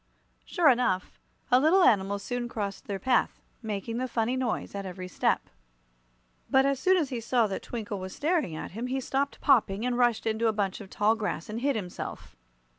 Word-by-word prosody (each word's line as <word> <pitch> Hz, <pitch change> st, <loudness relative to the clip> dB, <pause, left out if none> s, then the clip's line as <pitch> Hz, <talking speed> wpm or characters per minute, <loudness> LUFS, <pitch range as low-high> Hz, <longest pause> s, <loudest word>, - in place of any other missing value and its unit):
Sure 345 Hz, -3 st, +2 dB
enough, 245 Hz, -8 st, +1 dB, 0.3 s
a 250 Hz, -, +7 dB
little 335 Hz, +7 st, +5 dB
animal 200 Hz, -, +3 dB
soon 240 Hz, +4 st, -4 dB
crossed 200 Hz, -4 st, -5 dB
their 200 Hz, -, -2 dB
path, 245 Hz, +5 st, +1 dB, 0.2 s
making 220 Hz, +1 st, -4 dB
the 255 Hz, +1 st, -1 dB
funny 235 Hz, +1 st, 0 dB
noise 255 Hz, -3 st, -2 dB
at 200 Hz, 0 st, -4 dB
every 185 Hz, -1 st, -6 dB
step. 185 Hz, -, 0 dB, 1.0 s
But 265 Hz, 0 st, +4 dB
as 275 Hz, -1 st, +1 dB
soon 375 Hz, +4 st, +4 dB
as 310 Hz, -6 st, 0 dB
he 245 Hz, -4 st, -4 dB
saw 235 Hz, 0 st, +2 dB
that 195 Hz, -2 st, -3 dB
Twinkle 210 Hz, -4 st, -5 dB
was 185 Hz, 0 st, -7 dB
staring 300 Hz, -, 0 dB
at -, -, -6 dB
him 230 Hz, +6 st, -4 dB
he 265 Hz, +1 st, -1 dB
stopped 275 Hz, +2 st, -2 dB
popping 225 Hz, -5 st, +3 dB
and 250 Hz, -1 st, 0 dB
rushed 240 Hz, -2 st, +2 dB
into 225 Hz, +1 st, +1 dB
a 220 Hz, -, +2 dB
bunch 200 Hz, -1 st, -2 dB
of 195 Hz, -, -10 dB
tall 210 Hz, +3 st, +2 dB
grass 205 Hz, -7 st, -3 dB
and 220 Hz, +2 st, -4 dB
hid 280 Hz, 0 st, +1 dB
himself. 180 Hz, -5 st, -6 dB
230 Hz, 195 wpm, -28 LUFS, 200-255 Hz, 1.0 s, a